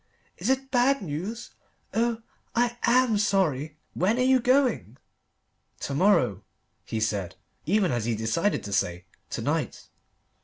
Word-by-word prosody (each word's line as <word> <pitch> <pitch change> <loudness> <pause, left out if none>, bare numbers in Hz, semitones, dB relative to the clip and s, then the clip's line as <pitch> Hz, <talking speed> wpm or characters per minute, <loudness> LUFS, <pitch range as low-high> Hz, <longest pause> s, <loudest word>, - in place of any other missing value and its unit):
"Is - - -1
it 265 0 0
bad 260 0 +3
news? 185 +9 -5 0.4
Oh 230 0 0 0.3
I 240 0 +2
am 240 -3 +3
sorry. 155 -8 +1 0.2
When 205 +6 +1
are 255 - +2
you 260 0 +4
going?" 245 - +1 0.8
"To 140 - -3
morrow," 135 - +3 0.4
he 110 - -3
said, 100 -4 -1 0.3
even 195 0 +2
as 120 -3 -1
he 115 -1 0
decided 115 - 0
to 100 - -5
say, 90 -3 -1 0.2
"to - - -4
night." - - -2
195 Hz, 140 wpm, -26 LUFS, -, 0.8 s, you